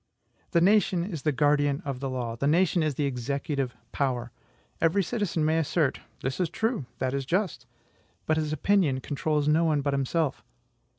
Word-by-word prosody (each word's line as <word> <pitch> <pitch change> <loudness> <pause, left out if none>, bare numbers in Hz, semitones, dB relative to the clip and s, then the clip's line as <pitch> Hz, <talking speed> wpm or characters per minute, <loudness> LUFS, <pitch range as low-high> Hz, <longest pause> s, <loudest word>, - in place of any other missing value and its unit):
The 170 - +3
nation 190 -2 +4
is 175 -6 -5
the 150 - +1
guardian 145 0 +2
of 135 -3 -3
the 135 0 -3
law 120 -3 -3
the 140 +4 -1
nation 175 +3 +3
is 155 -3 0
the 145 - 0
EXECUTIVE 135 0 -2 0.2
POWER. 125 -4 -1 0.5
Every 180 +5 +3
citizen 180 -6 -1
may 160 +1 +2
assert: 155 -2 +1 0.2
"This 130 +5 -2
is 180 -3 +1
true; 220 - -1
that 130 0 -1
is 140 0 -1
just;" 165 - -1 0.6
but 155 - +2
his 155 -1 -1
opinion 155 -5 +2
controls 150 +2 -1
no 155 +2 +4
one 155 -3 +2
but 140 0 0
himself. 140 +2 0
150 Hz, 175 wpm, -27 LUFS, 135-170 Hz, 0.6 s, nation